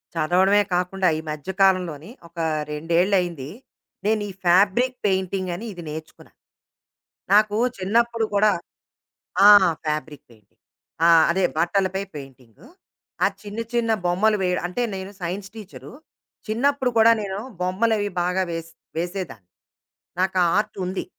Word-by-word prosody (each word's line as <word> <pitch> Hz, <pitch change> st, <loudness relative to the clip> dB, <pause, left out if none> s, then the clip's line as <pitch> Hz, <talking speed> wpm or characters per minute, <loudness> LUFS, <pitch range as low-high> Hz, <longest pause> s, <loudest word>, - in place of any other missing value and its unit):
చదవడమే 185 Hz, +6 st, +3 dB
కాకుండా 180 Hz, +1 st, 0 dB
ఈ -, -, -3 dB
మధ్య 150 Hz, +3 st, -6 dB
కాలంలోని 180 Hz, -3 st, +2 dB, 0.2 s
ఒక 170 Hz, +1 st, -12 dB, 0.3 s
రెండేళ్ళయింది. 170 Hz, -1 st, 0 dB, 0.6 s
నేను 215 Hz, 0 st, +1 dB
ఈ -, -, -6 dB
ఫ్యాబ్రిక్ 200 Hz, +8 st, +3 dB
పెయింటింగని 190 Hz, 0 st, -1 dB
ఇది 175 Hz, -2 st, -9 dB
నేర్చుకున్నా. 155 Hz, +1 st, -10 dB, 1.0 s
నాకు 210 Hz, 0 st, +4 dB, 0.2 s
చిన్నప్పుడు 230 Hz, +4 st, +1 dB
కూడా 210 Hz, +1 st, +4 dB, 1.0 s
ఆ! -, -, +10 dB, 0.4 s
Fabric 150 Hz, -1 st, -4 dB
painting. 105 Hz, -4 st, -24 dB, 0.5 s
ఆ! -, -, +6 dB, 0.2 s
అదే 185 Hz, +1 st, +1 dB
బట్టలపై 190 Hz, +3 st, 0 dB
పెయింటింగు. 135 Hz, -5 st, -12 dB, 0.6 s
ఆ -, -, +6 dB, 0.2 s
చిన్న 210 Hz, +2 st, -6 dB
చిన్న 235 Hz, -1 st, +1 dB, 0.2 s
బొమ్మలు 210 Hz, +5 st, +2 dB
వేయడు 180 Hz, -1 st, 0 dB
అంటే, 180 Hz, +8 st, -3 dB
నేను 190 Hz, +1 st, -6 dB
సైన్స్ 190 Hz, +3 st, -4 dB
టీచరు. 210 Hz, -4 st, -11 dB, 0.5 s
చిన్నప్పుడు 260 Hz, +4 st, +1 dB
కూడా 225 Hz, +1 st, +7 dB
నేను 195 Hz, -1 st, -4 dB, 0.2 s
బొమ్మలవి 205 Hz, +3 st, 0 dB
బాగా 180 Hz, +2 st, 0 dB
వేస్ 165 Hz, 0 st, -5 dB, 0.3 s
వేసేదాన్ని. 170 Hz, -, -5 dB, 0.7 s
నాకు 190 Hz, 0 st, 0 dB
ఆ -, -, +3 dB
ఆర్ట్‌ 210 Hz, -, -2 dB
ఉంది. 185 Hz, +1 st, -3 dB
185 Hz, 120 wpm, -23 LUFS, 170-205 Hz, 1.0 s, ఆ